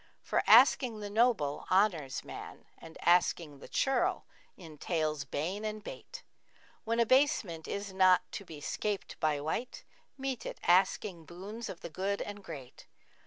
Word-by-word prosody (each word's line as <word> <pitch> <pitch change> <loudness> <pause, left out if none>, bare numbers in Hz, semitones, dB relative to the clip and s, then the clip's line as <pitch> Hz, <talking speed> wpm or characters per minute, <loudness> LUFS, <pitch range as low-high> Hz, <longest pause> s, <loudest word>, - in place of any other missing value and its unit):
For - - +1
asking 235 -5 +6
the 205 -1 -6
noble 215 - +1
honours 180 -9 +2
man - - -9
* - - -37
And 165 0 -12
asking 170 -4 +2
the - - -11
churl 270 -2 +1 0.3
entails 155 -3 -3
bane 175 +10 -3
and 215 -1 -4
bate: - - -9 0.6
When 230 +1 0
abasement 235 - +2
is 200 -1 -4
not 185 -1 +5
to - - -6
be 160 -5 -10
'scaped 205 +6 -3
by 155 -2 +1
wight 160 - -4 0.2
* - - -41
Meet 270 -2 -3
it - - -7
asking 185 -1 +2
boons 200 +7 -7
of 175 - -8
the 170 - -6
good 195 +4 -2
and 205 -1 -6
great. 140 -8 -10
190 Hz, 155 wpm, -31 LUFS, 160-215 Hz, 0.6 s, asking